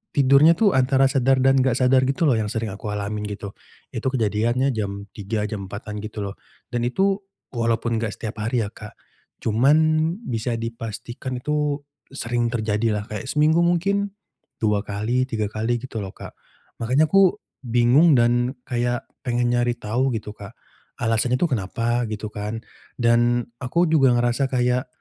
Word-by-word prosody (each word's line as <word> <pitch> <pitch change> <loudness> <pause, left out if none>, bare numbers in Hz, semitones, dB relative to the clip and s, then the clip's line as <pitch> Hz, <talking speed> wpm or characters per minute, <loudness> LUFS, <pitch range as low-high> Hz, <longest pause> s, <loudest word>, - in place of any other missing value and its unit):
tidurnya 140 +4 +6
itu 205 -1 +3
antara 130 +1 +3
sadar 135 -1 +3
dan 135 0 +4
nggak 130 -2 +2
sadar 130 0 +4
gitu 140 +5 +1
loh 140 - +4
yang 105 -1 -2
sering 110 -2 -3
aku 105 +2 -6
alamin, 105 +1 -3
gitu. 100 -1 -6 0.4
Itu - - -3
kejadiannya, 120 +2 +1
jam 100 -2 -4
3:00, 105 +1 -3
jam 100 -3 -6
4:00-an 105 +1 -6
gitu 105 -1 -5
loh, 100 +1 -6 0.4
dan 120 -1 -1
itu, 195 +8 +1 0.3
walaupun 115 0 0
nggak 110 -2 -3
setiap 110 -1 -6
hari 115 +1 0
ya, - - -6
Kak. 105 -1 -11 0.5
Cuman, 120 +7 +3 0.5
bisa 120 - -2
dipastikan 115 +2 -6
itu 150 +1 -1 0.3
sering 120 -3 -1
terjadi 110 -1 0
lah 105 - -2
kayak 105 +3 -5
seminggu 155 +3 +3
mungkin 200 +4 +1 0.5
2 105 -2 +2
kali, 110 +5 -1
3 110 -4 -2
kali, 115 +3 -1
gitu 120 -4 -5
loh 95 - -6
Kak. - - -9 0.5
Makanya 130 +7 +2
aku, 195 -2 +5 0.3
bingung 125 +7 +4
dan 120 +2 +2
kayak 120 0 -1 0.2
pengen 120 -1 +1
nyari 120 0 +1
tahu, 125 +5 0
gitu 105 -1 -5
Kak. 105 +2 -10 0.5
Alasannya 115 +2 +1
itu 175 - +2
kenapa, 120 +2 -1
gitu 110 0 -5
kan 105 +3 -5 0.4
dan 120 0 +2
aku 150 +8 +1
juga 140 -5 +4
ngerasa 120 +3 +1
kayak, 125 +1 +1
120 Hz, 160 wpm, -23 LUFS, 110-130 Hz, 0.5 s, tidurnya